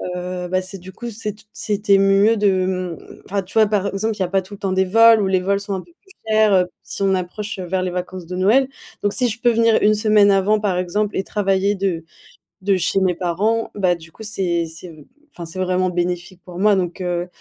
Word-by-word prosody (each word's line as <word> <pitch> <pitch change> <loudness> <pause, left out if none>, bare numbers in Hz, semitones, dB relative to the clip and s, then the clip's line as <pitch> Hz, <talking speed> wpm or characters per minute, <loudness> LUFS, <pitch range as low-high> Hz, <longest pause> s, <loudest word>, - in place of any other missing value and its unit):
heu, 180 0 -4
bah, 185 +1 0
c'est, 185 +1 -6
du 185 +1 -11
coup, 240 +5 -7
c'est 215 -1 -5
t 210 - -16
c'était 205 -2 +1
mieux 195 +3 +4
de, 190 -3 +2
mmh, 185 -3 -3 0.3
enfin, 200 +1 -2
tu 185 - -15
vois, 220 - +7
par 205 -1 0
exemple, 215 +3 -2
il 205 - -7
n'y - - +3
a - - -6
pas 195 +1 +1
tout 190 +2 -13
le 200 - -10
temps 195 - -2
des 190 0 +2
vols 225 +3 +6
où 195 - +1
les 190 -1 +2
vols 200 +2 0
sont 200 0 -5
un 190 - -3
peu 345 - -20
plus 385 -1 -22 0.2
chers, 215 -1 +4
heu, 185 -1 +4 0.2
si - - -7
on 195 -1 +3
approche, 195 +3 -5
heu, 185 - -4
vers 185 +1 -1
les 185 -1 -2
vacances 180 0 -5
de 180 - -5
Noël. 245 +8 +3 0.3
Donc 205 - +2
si 250 - +1
je 230 +1 -3
peux 240 - +4
venir 230 -1 +3
une 210 +1 +4
semaine 210 -1 +4
avant, 200 +2 +3
par 195 -4 0
exemple, 200 +4 -1
et 190 - 0
travailler 200 0 0
de 185 -4 -2 0.6
de 195 0 +2
chez 185 +2 +1
mes 185 -2 +2
parents, 205 +6 0
bah, 185 -3 +2
du 160 -1 -14
coup 220 - -12
c'est 180 -5 -1
c'est 160 +2 -9
v 155 -3 -13 0.3
enfin 170 - -7
c'est 165 +3 -7
vraiment 185 0 +1
bénéfique 175 +1 -3
pour 180 -1 -10
moi 205 +1 +4
donc, 180 0 -2
heu, 175 -1 -2
190 Hz, 255 wpm, -20 LUFS, 180-210 Hz, 0.6 s, vois